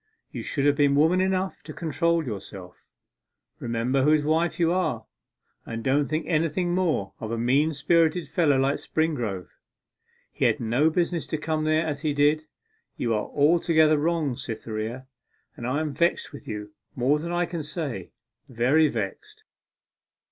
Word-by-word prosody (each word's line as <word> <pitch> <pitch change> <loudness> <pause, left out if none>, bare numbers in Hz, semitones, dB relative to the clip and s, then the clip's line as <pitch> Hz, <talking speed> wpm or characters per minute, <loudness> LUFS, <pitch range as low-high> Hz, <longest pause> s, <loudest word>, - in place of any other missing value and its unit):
You - - -5
should 140 -2 -2
have 145 0 +4
been 140 -1 +3
woman 160 +5 +4
enough 190 0 -1
to - - -9
control 165 +1 0
yourself. 100 -5 -8 0.7
Remember 120 +3 0
whose 150 +2 +4
wife 160 +2 +1
you 170 -1 +3
are, 125 -12 -1 0.6
and 115 0 -6
don't 140 +2 +2
think 155 +1 -2
anything 165 +2 0
more 165 - 0
of 110 - -5
a 115 - -2
mean 135 +7 +2
spirited 160 +2 +2
fellow 150 -2 +2
like 135 +2 +2
Springrove; 120 - -2 0.8
he - - -1
had - - +2
no 125 +7 +2
business 170 0 -1
to 155 - -2
come 155 0 -2
there 155 +1 +2
as 145 -2 -3
he 150 -2 -1
did. 150 +2 +2 0.5
You 115 - 0
are 105 -1 -1
altogether 155 0 +3
wrong, 155 -4 0
Cytherea, 115 +2 -5 0.5
and 120 - -5
I 140 +5 0
am 155 -2 -3
vexed 170 -1 0
with 140 - -11
you 105 -1 -6 0.2
more 135 +5 +2
than 170 +3 -5
I 175 0 +1
can 170 -1 -5
say 145 - -5 0.4
very 130 +6 +3
vexed. 105 -8 -5
150 Hz, 160 wpm, -25 LUFS, 125-165 Hz, 0.8 s, have